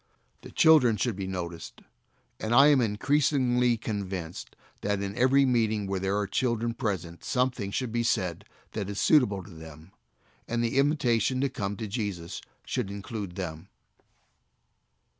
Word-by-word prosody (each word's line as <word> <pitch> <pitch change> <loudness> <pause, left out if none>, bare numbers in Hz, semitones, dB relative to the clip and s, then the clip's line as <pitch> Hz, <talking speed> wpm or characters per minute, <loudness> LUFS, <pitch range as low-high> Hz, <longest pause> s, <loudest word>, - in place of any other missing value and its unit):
The - - -11
children 135 -9 +5
should 115 +1 -1
be 95 -1 -4
noticed; 85 -3 -6 0.6
and 110 +2 0
I 140 +3 +8
am 140 -3 +5
increasingly 125 +1 +2
convinced 95 -6 -5 0.3
that 100 0 -1
in 100 0 -4
every 130 +2 +4
meeting 110 -5 +1
where 95 -1 -2
there 95 +2 0
are 105 - 0
children 115 +2 -1
present 95 -8 -4
something 125 -5 0
should 120 +3 -2
be 120 +1 0
said 100 -5 -1 0.3
that 100 -3 -4
is 100 - -4
suitable 105 - +3
to 100 - -13
them, 80 +1 -12 0.6
and 120 0 -1
the 120 +3 +1
invitation 130 -4 +2
to 140 - +1
come 100 -5 -4
to 110 - -4
Jesus 100 -6 -4 0.2
should - - -2
include 100 -2 -6
them. 85 -1 -6
105 Hz, 150 wpm, -28 LUFS, 95-125 Hz, 0.6 s, I